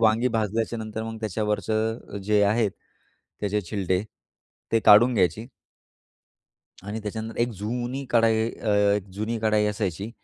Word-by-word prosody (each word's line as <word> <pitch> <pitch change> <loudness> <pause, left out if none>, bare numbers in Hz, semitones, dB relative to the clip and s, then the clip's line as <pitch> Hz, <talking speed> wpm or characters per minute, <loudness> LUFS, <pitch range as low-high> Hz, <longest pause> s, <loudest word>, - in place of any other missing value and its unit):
वांगी 115 +2 +3
भाजल्याच्यानंतर 110 0 -2
मग 115 0 -5
त्याच्यावरचं 110 +1 -2
जे 105 0 +3
आहेत, 105 +1 +2 0.7
त्याचे 105 0 0
छिलटे, 95 -1 -1 0.7
ते 115 - +4
काढून 120 +5 +7
घ्यायची 105 +3 +1 1.4
आणि 105 +3 -5
त्याच्यानंतर 110 +2 -5
एक 120 - +2
जुनी 120 +5 -3
कढाई 115 -1 +3
अ, 110 - -6 0.3
एक 105 - -4
जुनी 110 +3 -2
कढाई 110 -1 +3
असायची 100 -1 -2
110 Hz, 125 wpm, -25 LUFS, 105-115 Hz, 1.4 s, काढून